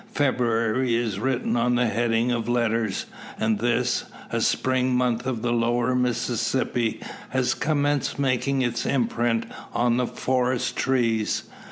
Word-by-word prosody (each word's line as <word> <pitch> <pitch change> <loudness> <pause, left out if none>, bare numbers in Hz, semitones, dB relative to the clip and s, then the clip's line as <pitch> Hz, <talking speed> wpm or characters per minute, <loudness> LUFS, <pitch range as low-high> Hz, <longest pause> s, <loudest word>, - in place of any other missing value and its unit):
February 120 -2 +1
is 115 -5 -1
written 130 +1 0
on 120 +1 +2
the 125 0 +2
heading 115 +1 +1
of 120 -1 -1
letters, 115 -4 0 0.3
and 110 -1 +1
this, 120 +1 +1 0.3
a - - 0
Spring 130 -1 +1
month 125 0 0
on 120 -4 -2
the 120 0 +1
Lower 120 +1 +1
Mississippi, 125 -1 0 0.3
has 125 -1 +1
commenced 145 -2 0
making 135 0 +1
its 120 -1 -1
imprint 120 -2 0 0.3
on 120 0 +2
the 125 -1 +1
forest 125 -1 0
trees. 115 -5 +1
120 Hz, 135 wpm, -25 LUFS, 115-130 Hz, 0.3 s, on